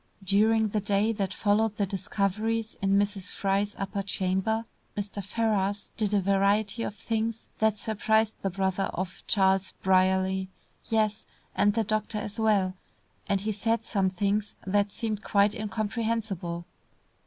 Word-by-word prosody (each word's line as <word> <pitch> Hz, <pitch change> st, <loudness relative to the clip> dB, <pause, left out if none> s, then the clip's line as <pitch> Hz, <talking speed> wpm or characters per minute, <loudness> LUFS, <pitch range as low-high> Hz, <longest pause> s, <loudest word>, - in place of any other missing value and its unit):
During 215 Hz, +3 st, +3 dB
the 210 Hz, -, 0 dB
day 205 Hz, +2 st, +2 dB
that 200 Hz, -3 st, -2 dB
followed 215 Hz, +1 st, +1 dB
the 205 Hz, -, +1 dB
discoveries 215 Hz, +4 st, -1 dB
in 195 Hz, 0 st, +3 dB
Mrs. 200 Hz, -1 st, 0 dB
Fry's 200 Hz, +1 st, 0 dB
upper 195 Hz, +1 st, -2 dB
chamber, 195 Hz, +3 st, 0 dB, 0.3 s
Mr. 200 Hz, 0 st, -3 dB
Ferrars 205 Hz, -1 st, 0 dB
did 210 Hz, -3 st, 0 dB
a -, -, +4 dB
variety 200 Hz, +3 st, +2 dB
of 210 Hz, -, -3 dB
things 225 Hz, +1 st, -2 dB
that 220 Hz, -1 st, +3 dB
surprised 220 Hz, +1 st, +1 dB
the 195 Hz, -, 0 dB
brother 190 Hz, +1 st, 0 dB
of 185 Hz, +1 st, -4 dB
Charles 190 Hz, -2 st, +3 dB
Brierly; 190 Hz, 0 st, +2 dB, 0.4 s
yes, 215 Hz, -1 st, 0 dB, 0.3 s
and 205 Hz, 0 st, +3 dB
the 225 Hz, -, +2 dB
doctor 215 Hz, +1 st, -1 dB
as 210 Hz, +1 st, -4 dB
well, 205 Hz, -4 st, +3 dB, 0.6 s
and 195 Hz, -1 st, +2 dB
he 215 Hz, +2 st, -1 dB
said 225 Hz, +2 st, 0 dB
some 195 Hz, -3 st, +1 dB
things 205 Hz, +2 st, -1 dB
that 200 Hz, +1 st, +2 dB
seemed 215 Hz, -2 st, -2 dB
quite 200 Hz, 0 st, +3 dB
incomprehensible. 215 Hz, -4 st, -2 dB
205 Hz, 145 wpm, -28 LUFS, 195-220 Hz, 0.6 s, a